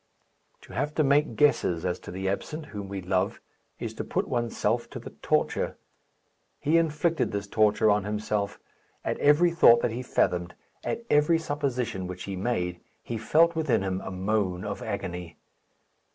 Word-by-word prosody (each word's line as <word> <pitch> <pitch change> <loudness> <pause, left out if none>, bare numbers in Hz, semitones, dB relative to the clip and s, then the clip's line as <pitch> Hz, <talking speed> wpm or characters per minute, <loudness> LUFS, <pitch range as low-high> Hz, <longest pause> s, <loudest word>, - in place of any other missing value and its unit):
To - - -14
have 150 +1 -2
to 155 - +3
make 145 +2 +3
guesses 90 - +2
as 90 0 -1
to - - -11
the 95 +2 -4
absent 150 +11 -3
whom 100 -2 -5
we 100 -1 -5
love 95 +2 0 0.4
is - - -4
to - - -4
put - - -1
oneself 120 -1 -1
to - - -7
the - - -9
torture. - - 0 0.8
He 155 +3 +3
inflicted 165 +1 0
this 100 0 -3
torture 105 +1 +3
on 105 -1 +2
himself. 105 0 -2 0.5
At - - -1
every 150 +4 +5
thought 120 -8 +6
that - - +1
he 120 +3 -4
fathomed, 90 -8 0 0.3
at 235 - -3
every 150 +3 +5
supposition 125 - -2
which 90 0 -7
he 100 - -4
made, 90 -4 -1 0.2
he 115 -2 -4
felt 165 +9 +4
within 150 -11 +1
him 95 -1 -2
a - - -6
moan 95 -1 -1
of 100 -1 -4
agony. 90 -6 -5
105 Hz, 165 wpm, -27 LUFS, 95-145 Hz, 0.8 s, thought